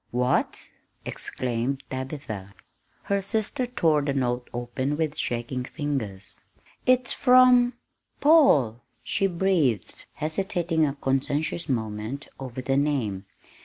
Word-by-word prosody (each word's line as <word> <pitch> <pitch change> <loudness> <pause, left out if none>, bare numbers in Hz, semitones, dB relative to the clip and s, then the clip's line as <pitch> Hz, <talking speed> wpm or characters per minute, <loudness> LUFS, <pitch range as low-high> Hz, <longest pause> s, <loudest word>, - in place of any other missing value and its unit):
"What!" 125 +1 0 0.3
exclaimed 125 +2 -3
Tabitha. 130 -8 -6 0.5
Her 200 0 0
sister 220 +6 -1
tore 160 -11 +2
the 140 -1 -1
note 125 -2 -1
open 125 +4 -2
with 155 -2 -1
shaking 120 +2 -2
fingers. 125 - -4 0.5
"It's 255 -1 +3
from 250 -1 +6 0.5
Paul!" 150 - +5 0.2
she 195 - +1
breathed, 170 - 0
hesitating 165 0 0
a 140 - -3
conscientious 140 +4 -1
moment 110 +2 -3
over 130 -1 -6
the 135 +1 +1
name. 120 -10 0
140 Hz, 105 wpm, -26 LUFS, 120-175 Hz, 0.5 s, from